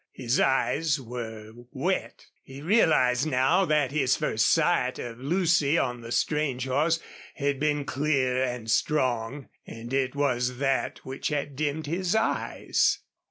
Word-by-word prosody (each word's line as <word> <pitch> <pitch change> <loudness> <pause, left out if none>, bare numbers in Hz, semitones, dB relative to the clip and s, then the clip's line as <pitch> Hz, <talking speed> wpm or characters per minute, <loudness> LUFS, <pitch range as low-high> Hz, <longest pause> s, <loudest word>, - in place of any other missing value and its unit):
His 125 0 -1
eyes 145 +3 +1
were 115 -3 -7 0.2
wet. - - -2 0.2
He 135 +2 -11
realized 155 - +3
now 150 +8 +3
that 150 -5 +1
his 135 -3 +2
first 110 0 +1
sight 165 -6 +2
of 120 -1 -7
Lucy 165 0 +2
on 125 -4 -1
the 115 0 -9
strange 140 -3 0
horse 155 +5 +1 0.4
had 140 -2 -1
been 150 -1 0
clear 135 -3 0
and 125 -3 -4
strong, 130 -1 0 0.2
and 115 +2 -8
it 135 0 0
was 125 -3 0
that 135 0 -1
which 130 +1 -4
had 145 -2 -3
dimmed 150 +2 -2
his 175 +5 -1
eyes. 220 0 +1
135 Hz, 140 wpm, -27 LUFS, 125-150 Hz, 0.4 s, realized